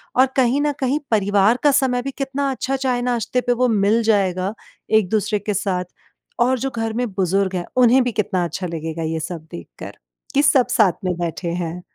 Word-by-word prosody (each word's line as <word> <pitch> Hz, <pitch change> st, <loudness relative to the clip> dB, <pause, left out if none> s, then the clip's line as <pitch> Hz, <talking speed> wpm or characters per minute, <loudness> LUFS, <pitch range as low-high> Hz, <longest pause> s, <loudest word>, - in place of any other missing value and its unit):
और 260 Hz, -, +6 dB
कहीं 260 Hz, +3 st, +3 dB
न 295 Hz, -, +1 dB
कहीं 270 Hz, +3 st, 0 dB
परिवार 205 Hz, +2 st, +3 dB
का 290 Hz, -, +5 dB
समय 260 Hz, -3 st, +2 dB
भी 275 Hz, +2 st, -4 dB
कितना 275 Hz, 0 st, -2 dB
अच्छा 265 Hz, +1 st, -2 dB
चाय-नाश्ते 250 Hz, -2 st, -1 dB
पे 245 Hz, -, +1 dB
वो 250 Hz, +1 st, +1 dB
मिल 215 Hz, +1 st, +2 dB
जाएगा 195 Hz, -3 st, +1 dB, 0.4 s
एक-दूसरे 215 Hz, 0 st, +2 dB
के 205 Hz, +1 st, -3 dB
साथ 185 Hz, -2 st, -1 dB, 0.5 s
और 250 Hz, +2 st, +2 dB
जो 270 Hz, -, -2 dB
घर 225 Hz, -1 st, -2 dB
में 245 Hz, +2 st, -1 dB
बुज़ुर्ग 190 Hz, 0 st, 0 dB
हैं, 175 Hz, -, -2 dB
उन्हें 255 Hz, +1 st, +5 dB
भी 245 Hz, -, -1 dB
कितना 210 Hz, -4 st, -1 dB
अच्छा 175 Hz, +2 st, -4 dB
लगेगा 165 Hz, 0 st, -5 dB
ये 160 Hz, 0 st, -2 dB
सब 160 Hz, -1 st, -6 dB
देखकर 170 Hz, -, -10 dB, 0.4 s
कि 280 Hz, -, +4 dB
सब 260 Hz, -4 st, +4 dB
साथ 210 Hz, -5 st, +4 dB
में 180 Hz, -, +1 dB
बैठे 170 Hz, 0 st, -3 dB
हैं। 175 Hz, 0 st, -4 dB
220 Hz, 190 wpm, -20 LUFS, 185-250 Hz, 0.5 s, और